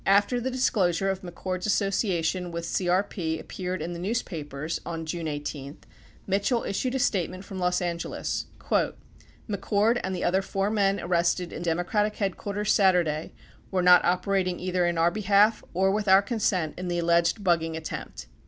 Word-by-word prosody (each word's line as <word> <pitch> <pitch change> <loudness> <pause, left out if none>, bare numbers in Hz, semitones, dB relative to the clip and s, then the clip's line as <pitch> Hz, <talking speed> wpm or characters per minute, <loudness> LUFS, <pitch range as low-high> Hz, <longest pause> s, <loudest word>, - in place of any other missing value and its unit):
73 195 - +6
After 205 +4 0
the 260 - -1
disclosure 195 -8 +1
of 190 0 -5
McCord's 185 +1 -4
association 190 -4 0
with 170 0 -4
CEP 175 -2 0
appeared 180 -2 -4
in 175 +2 -4
the 170 - -6
newspapers 165 - -3
on 165 -1 -5
June 165 0 -3
18, 145 -1 -5 0.5
Mitchell 200 +5 +1
issued 250 +6 -2
a - - +2
statement 185 -5 -1
from 190 -1 -7
Los 180 0 +1
Angeles: 170 -1 -3 1.0
"McCord 210 +3 +1
and 190 0 -2
the 180 - -3
other 190 +2 +2
four 195 +1 -1
men 200 -2 +2
arrested 175 0 0
in - - -6
Democratic 175 +5 0
headquarters 205 +1 -1
Saturday 175 -6 +2 0.4
were 185 -2 0
not 180 0 +7
operating 185 0 +1
either 180 -1 0
in 170 -1 -1
our 165 +1 +3
behalf 210 +2 +3
or 190 +2 +2
with 210 +1 -1
our 190 +1 +7
consent 200 - 0
in 185 - -4
the 175 0 -1
alleged 170 +4 +2
bugging 165 -3 +1
attempt." 160 - -6
185 Hz, 160 wpm, -27 LUFS, 170-200 Hz, 1.0 s, not